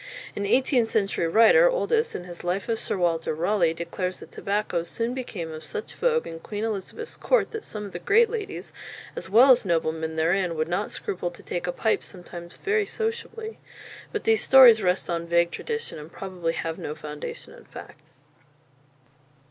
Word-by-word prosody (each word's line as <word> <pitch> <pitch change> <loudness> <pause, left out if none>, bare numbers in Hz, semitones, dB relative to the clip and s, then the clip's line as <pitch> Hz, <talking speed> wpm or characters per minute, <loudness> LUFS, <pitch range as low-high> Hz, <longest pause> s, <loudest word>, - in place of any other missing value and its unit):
An 200 0 -2
eighteenth 250 0 +3
century 195 -5 0
writer, 230 - +6
Oldys, 475 -2 0
in - - -4
his 175 -1 -9
"Life 180 +3 -1
of 225 -1 -1
Sir - - -2
Walter 165 -3 0
Raleigh," 170 0 +1
declares 180 +2 -4
that - - -12
tobacco 200 -4 -1
"soon 230 +8 -3
became 205 -11 -5
of 155 0 -8
such 440 0 -6
vogue 475 -1 +1
in 165 - -7
Queen 205 +5 -5
Elizabeth's 225 - -4
court, - - +1
that 445 - -5
some 210 -1 -6
of 200 - -8
the - - -6
great 455 +4 +4
ladies, 420 -4 -5 0.4
as 180 - -6
well 240 +7 +7
as 250 - +5
noblemen 160 -3 -1
therein, 170 +2 +1
would 155 0 -1
not 180 +5 -1
scruple 175 -2 -3
to 175 - -15
take 175 0 -4
a - - +1
pipe 220 +5 0
sometimes 175 -2 -10
very 420 0 0
sociably." 450 0 -4 0.5
But 430 - -3
these 220 -1 +3
stories 245 -5 +8
rest 180 -1 +1
on 170 -1 -2
vague 170 0 +3
tradition, 455 - -4
and 150 +2 -11
probably 180 -4 -3
have 165 -1 -4
no 150 - -5
foundation 150 -1 -8
in - - -15
fact. - - -12
195 Hz, 180 wpm, -25 LUFS, 170-265 Hz, 0.5 s, stories